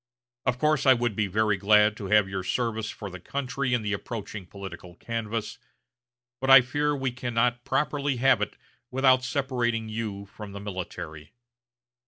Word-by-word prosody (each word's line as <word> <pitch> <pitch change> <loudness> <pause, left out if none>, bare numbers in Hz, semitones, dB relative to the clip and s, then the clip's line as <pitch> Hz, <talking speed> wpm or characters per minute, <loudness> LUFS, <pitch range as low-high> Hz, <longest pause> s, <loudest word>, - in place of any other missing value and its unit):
Of 125 -1 +2
course 150 0 +2
I 130 - +8
would 120 -3 -1
be 105 -1 +1
very 105 +1 +1
glad 105 +1 +4
to 100 - -5
have 105 0 +4
your 95 -1 -3
service 110 +1 -1
for 100 -3 -7
the 95 - -8
country 130 +3 -2
in 115 - -2
the 105 0 -1
approaching 105 -2 -6
political 95 -3 -9
canvass; 115 +2 -4 0.8
but 135 - -2
I 135 -1 +11
fear 145 +4 0
we 135 -2 -1
cannot 120 0 0
properly 145 0 0
have 125 -2 +3
it 105 - -3 0.3
without 130 0 +4
separating 125 -5 -1
you 110 -3 -4
from 100 0 -10
the 100 - -6
military." 95 -4 -7
115 Hz, 165 wpm, -27 LUFS, 105-130 Hz, 0.8 s, I